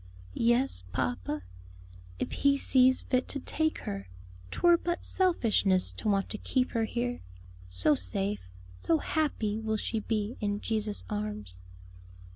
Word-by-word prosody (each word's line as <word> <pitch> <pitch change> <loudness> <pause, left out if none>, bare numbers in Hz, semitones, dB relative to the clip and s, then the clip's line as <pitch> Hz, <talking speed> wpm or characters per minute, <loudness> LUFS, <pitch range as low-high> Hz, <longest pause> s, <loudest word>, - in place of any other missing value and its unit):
"Yes, 240 - +3
papa 100 -4 -2 0.7
if - - -3
He 280 0 +3
sees 260 -1 +5
fit 255 -1 0
to 280 - -4
take 315 +3 0
her; 100 -1 -5 0.4
'twere 345 - +5
but 345 +1 -2
selfishness 225 - +2
to 215 - -3
want 195 -1 +2
to 215 - -5
keep 255 -1 0
her 225 -2 +1
here. 245 +2 -2 0.5
So 90 +11 +3
safe, 95 -3 -1 0.2
so 320 - +1
happy 230 -10 -1
will 220 -1 -1
she 220 +1 -2
be 215 +1 -2
in 205 -1 -1
Jesus' 215 -1 -2
arms." 205 - -5
215 Hz, 135 wpm, -30 LUFS, 155-255 Hz, 0.7 s, sees